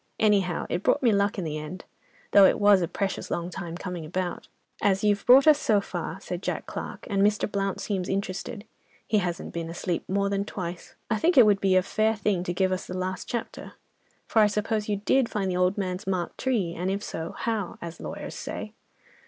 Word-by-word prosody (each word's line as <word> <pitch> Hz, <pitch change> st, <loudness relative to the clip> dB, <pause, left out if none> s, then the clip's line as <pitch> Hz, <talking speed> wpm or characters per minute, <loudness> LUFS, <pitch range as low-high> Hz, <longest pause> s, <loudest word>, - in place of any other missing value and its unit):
Anyhow 195 Hz, -5 st, +2 dB
it -, -, -2 dB
brought 280 Hz, -, +2 dB
me 235 Hz, -, +5 dB
luck 200 Hz, 0 st, +1 dB
in 190 Hz, -, -2 dB
the 155 Hz, -2 st, -3 dB
end, 155 Hz, +5 st, -8 dB, 0.5 s
though 200 Hz, -1 st, +8 dB
it -, -, +4 dB
was 205 Hz, -2 st, +6 dB
a 170 Hz, -, 0 dB
precious 195 Hz, +3 st, -3 dB
long 175 Hz, +1 st, -3 dB
time 175 Hz, -2 st, -6 dB
coming 180 Hz, -3 st, -5 dB
about." 175 Hz, +3 st, -4 dB, 0.3 s
"As 195 Hz, 0 st, +2 dB
you've 205 Hz, -1 st, +2 dB
brought 260 Hz, +2 st, +8 dB
us 305 Hz, -2 st, +6 dB
so 220 Hz, -8 st, +3 dB
far," 200 Hz, -, -5 dB
said -, -, -5 dB
Jack -, -, -3 dB
Clarke, -, -, -7 dB
"and 195 Hz, -1 st, 0 dB
Mr. 210 Hz, +1 st, +3 dB
Blount 195 Hz, -2 st, -2 dB
seems 190 Hz, -3 st, -2 dB
interested 200 Hz, +3 st, -3 dB, 0.4 s
(he 215 Hz, -, +2 dB
hasn't 175 Hz, -3 st, -3 dB
been 165 Hz, -1 st, -4 dB
asleep 175 Hz, 0 st, -2 dB
more 200 Hz, +1 st, +1 dB
than 200 Hz, 0 st, 0 dB
twice), 180 Hz, -4 st, -6 dB, 0.2 s
I 220 Hz, -, +3 dB
think 325 Hz, +8 st, +2 dB
it 250 Hz, -, +10 dB
would 205 Hz, -2 st, +3 dB
be 190 Hz, -1 st, +3 dB
a 185 Hz, -, +5 dB
fair 220 Hz, +3 st, +1 dB
thing 200 Hz, -3 st, 0 dB
to 175 Hz, -, -1 dB
give 185 Hz, +1 st, +1 dB
us 185 Hz, -, -2 dB
the 185 Hz, -, -5 dB
last 185 Hz, 0 st, -3 dB
chapter. 235 Hz, -, -5 dB, 0.5 s
For, 225 Hz, -, +2 dB
I 210 Hz, -, +7 dB
suppose 210 Hz, +1 st, -1 dB
you 205 Hz, -, +2 dB
did 230 Hz, +5 st, +2 dB
find 195 Hz, -3 st, -1 dB
the 180 Hz, -, -1 dB
old 180 Hz, +2 st, +2 dB
man's 190 Hz, +1 st, -3 dB
marked 185 Hz, -3 st, -2 dB
tree, 215 Hz, -10 st, 0 dB
and 180 Hz, +2 st, -2 dB
if 200 Hz, +2 st, -2 dB
so, 160 Hz, +1 st, -5 dB
how? 220 Hz, -5 st, -2 dB
as 170 Hz, -1 st, -8 dB
lawyers -, -, -6 dB
say." -, -, -6 dB
195 Hz, 220 wpm, -26 LUFS, 180-210 Hz, 0.5 s, it